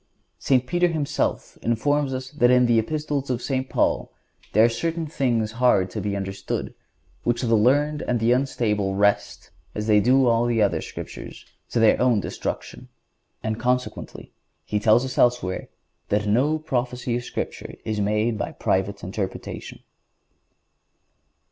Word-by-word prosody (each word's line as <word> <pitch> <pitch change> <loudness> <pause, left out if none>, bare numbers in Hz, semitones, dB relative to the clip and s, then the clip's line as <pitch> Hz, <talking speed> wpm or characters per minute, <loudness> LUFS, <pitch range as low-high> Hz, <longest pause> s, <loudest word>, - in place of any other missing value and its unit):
St. 130 -2 +2
Peter 175 +5 +2
himself 155 -4 -2
informs 140 +5 +1
us 130 0 -5
that 135 -5 +3
in 125 0 +5
the 120 -1 +4
Epistles 145 +2 -2
of 125 -2 0
St. 130 -1 -2
Paul - - 0 0.4
there 110 +2 +5
are - - +6
"certain 160 +8 -2
things 120 -7 0
hard 110 -6 +2
to 105 - -4
be 100 0 -2
understood, 95 0 -4 0.5
which 120 +1 0
the 115 -1 +3
unlearned 145 +7 +3
and 120 -1 +1
the 115 +2 +2
unstable 110 -7 0
wrest, 100 +1 0 0.2
as 105 - -3
they 105 -1 +5
do 130 +5 +4
also 120 0 +3
the 115 -1 +1
other 105 -2 +2
Scriptures, - - -8 0.2
to - - 0
their 110 +1 +4
own 125 -4 +4
destruction."(146) - - -5 0.6
And 110 0 -2
consequently 125 +1 -3 0.3
he 105 - -1
tells 110 +4 +4
us 130 -1 -4
elsewhere 120 -7 +1 0.4
"that 105 +1 +1
no 130 +9 +2
prophecy 125 -5 -2
of 120 - -2
Scripture - - -5
is 110 -1 -1
made 105 +2 0
by - - -3
private 95 +1 -1
interpretation." 95 +1 -5
120 Hz, 150 wpm, -24 LUFS, 105-130 Hz, 0.6 s, are